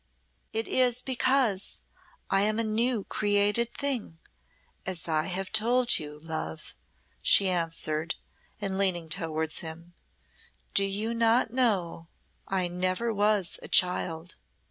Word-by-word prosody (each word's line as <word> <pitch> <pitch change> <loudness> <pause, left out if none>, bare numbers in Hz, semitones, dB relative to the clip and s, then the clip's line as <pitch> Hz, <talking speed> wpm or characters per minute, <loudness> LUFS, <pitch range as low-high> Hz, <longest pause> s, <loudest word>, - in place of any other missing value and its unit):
"It 225 +1 -2
is 250 -1 +2
because 255 -6 0 0.5
I 195 - +4
am 215 +1 +2
a 230 - +3
new 225 0 +1
created 205 +4 +2
thing, 260 - -1 0.7
as 180 -3 -2
I 155 -1 +1
have 190 +1 -4
told 240 +3 +3
you, 150 -1 -8
love," 155 - -5 0.5
she 200 - +4
answered, 165 -2 -2 0.4
and 195 -2 -2
leaned 175 -5 +1
towards 160 0 -1
him. 170 +1 -7 0.8
"Do 200 - +5
you 210 +4 -1
not 230 0 +2
know 195 -10 0 0.4
I 185 -2 0
never 185 +6 -1
was 205 -3 +1
a - - -7
child. 175 -2 +1
195 Hz, 120 wpm, -28 LUFS, 170-225 Hz, 0.8 s, Do